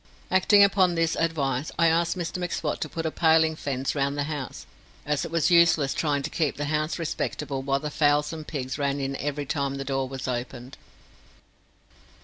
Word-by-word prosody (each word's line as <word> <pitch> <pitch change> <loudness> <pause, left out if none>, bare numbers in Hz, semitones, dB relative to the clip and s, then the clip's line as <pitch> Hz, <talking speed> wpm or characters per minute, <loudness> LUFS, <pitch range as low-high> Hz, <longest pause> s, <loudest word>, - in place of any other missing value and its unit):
Acting 200 +2 +6
upon 190 -3 +3
this 165 0 +1
advice, 145 -4 -1
I 170 - +4
asked 170 +2 +1
Mr 175 0 -4
M'Swat 170 -4 -2
to 155 - -2
put 165 +2 -4
a 160 - 0
paling 160 -1 +3
fence 135 -3 -2
round 140 0 -1
the 145 - 0
house, 145 -3 -5 0.4
as 150 -1 0
it - - -6
was 165 +2 +1
useless 170 -5 +4
trying 145 -3 0
to - - -4
keep 155 -4 -1
the 145 - -2
house 155 +2 -1
respectable 150 -4 -3
while 135 0 0
the 150 - -4
fowls 150 0 +2
and 155 -2 -7
pigs 130 -2 -4
ran 140 0 0
in 135 0 -2
every 145 0 -3
time 140 -1 -2
the 135 0 -5
door 135 -1 -1
was 135 -1 -6
opened. 125 +1 -5
150 Hz, 190 wpm, -26 LUFS, 140-165 Hz, 0.4 s, Acting